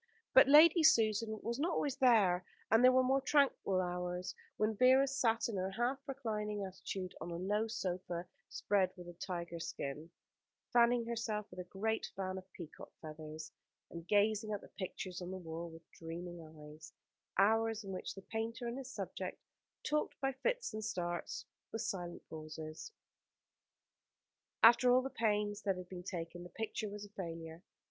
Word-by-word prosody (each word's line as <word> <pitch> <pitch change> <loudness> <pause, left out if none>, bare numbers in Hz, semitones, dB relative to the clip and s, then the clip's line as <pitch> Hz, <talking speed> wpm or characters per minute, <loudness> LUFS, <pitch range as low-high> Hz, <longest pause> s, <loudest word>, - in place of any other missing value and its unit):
But - - +9
Lady 315 +4 +8
Susan 220 -6 +4
was 235 +3 -2
not 335 +4 +1
always 280 -4 0
there; 210 -9 +5 0.3
and 225 +2 +6
there 255 - +9
were 255 0 +5
more 265 +2 +3
tranquil 275 -9 +3
hours, 180 0 -2 0.2
when 215 +1 +1
Vera 260 +4 +6
sat 240 -4 +1
in 220 -4 -3
her 185 +1 -1
half 240 +7 0
reclining 210 -6 -3
attitude 190 0 -5
on - - -4
a 170 - -4
low 205 +5 0
sofa 180 -4 -3 0.2
spread 195 -3 +2
with 175 -1 -10
a 175 - -8
tiger 170 -1 -5
skin, 150 0 -5 0.6
fanning 240 0 +5
herself 225 -3 -3
with 180 - -9
a - - -3
great 220 +3 -1
fan 190 0 -3
of 185 0 -17
peacock's 170 -4 -10
feathers, 155 0 -8 0.4
and 170 0 -8
gazing 215 +1 +3
at 205 - -2
the - - -14
pictures 185 -1 -5
on 180 - -5
the 190 - -4
wall 170 -1 -6
with 165 0 -14
dreaming 170 +1 -7
eyes: 155 -1 -12 0.5
hours 225 +2 +3
in 195 - -6
which 185 - -5
the 195 - -10
painter 230 +2 -3
and 240 +3 -3
his 260 -1 -7
subject - - -5 0.4
talked 300 0 -1
by 270 0 +1
fits 475 - -1
and 215 0 -4
starts 175 -5 -3 0.3
with 225 - -3
silent 175 -2 -4
pauses. 155 - -7 1.7
After 240 +2 +8
all 255 +1 +5
the 270 - -4
pains 210 -2 0
that 195 -3 0
had 180 -1 -8
been 180 -2 -6
taken, 175 -1 -5
the 175 - -9
picture 220 0 -3
was 205 0 -7
a - - -14
failure. 165 -4 -7
205 Hz, 170 wpm, -35 LUFS, 175-230 Hz, 1.7 s, But